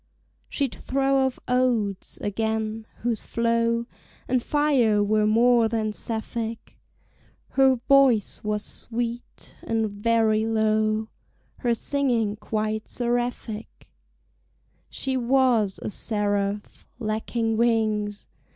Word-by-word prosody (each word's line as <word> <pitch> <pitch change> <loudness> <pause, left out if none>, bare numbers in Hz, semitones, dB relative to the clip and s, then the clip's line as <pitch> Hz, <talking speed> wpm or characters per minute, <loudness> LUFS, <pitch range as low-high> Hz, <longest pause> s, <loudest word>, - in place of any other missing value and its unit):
She'd 275 -4 -1
throw 270 0 +1
off 255 - -5
odes, 240 -6 0
again, 220 +1 -2 0.2
whose 235 -3 -1
flow 230 0 +1 0.4
And 255 0 +1
fire 255 -8 +2
were 210 +1 +2
more 235 +1 +4
than 220 -1 -1
Sapphic; 225 +1 -4 0.7
Her 265 -1 +4
voice 255 -3 +3
was 210 0 -2
sweet, 235 +1 -6
and 225 -2 -1
very 220 +1 +2
low; 215 0 +1 0.5
Her 240 -1 +1
singing 235 -6 0
quite 215 0 -3
seraphic: 240 -2 -3 1.0
She 265 -1 -2
was 245 -5 +2
a - - -3
seraph, 205 -1 -2
lacking 225 0 -1
wings. 215 -3 +1
225 Hz, 95 wpm, -25 LUFS, 215-245 Hz, 1.0 s, more